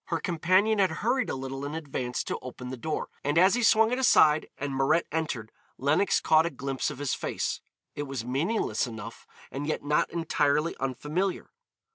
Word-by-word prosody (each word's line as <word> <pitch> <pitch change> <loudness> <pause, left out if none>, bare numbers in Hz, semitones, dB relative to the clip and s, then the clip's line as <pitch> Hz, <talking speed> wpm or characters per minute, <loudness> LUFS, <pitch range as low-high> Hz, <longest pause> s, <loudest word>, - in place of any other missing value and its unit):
Her 165 - -2
companion 185 +5 +2
had 190 -2 +4
hurried 250 +4 0
a - - -2
little 135 +1 -5
in 145 +2 -4
advance 135 -6 -3
to - - -4
open 125 0 -8
the - - -4
door, 150 +5 -3
and 145 +3 0
as 185 +3 +6
he 245 - +1
swung 225 -1 +5
it 250 - 0
aside 155 -11 +5
and 140 -1 -3
Mirette 145 +5 +2
entered 145 -9 -3 0.3
Lenox 150 +8 +2
caught 160 +1 +4
a - - -1
glimpse 135 -2 -3
of 150 - -7
his 145 -1 -1
face. - - -2 0.3
It 145 0 -5
was 135 -4 -4
meaningless 145 - 0
enough, 115 -1 -9 0.2
and 145 +2 -4
yet 155 - -2
not 150 +1 +1
entirely 155 -1 +1
unfamiliar. 150 +8 -2
150 Hz, 185 wpm, -28 LUFS, 135-175 Hz, 0.3 s, as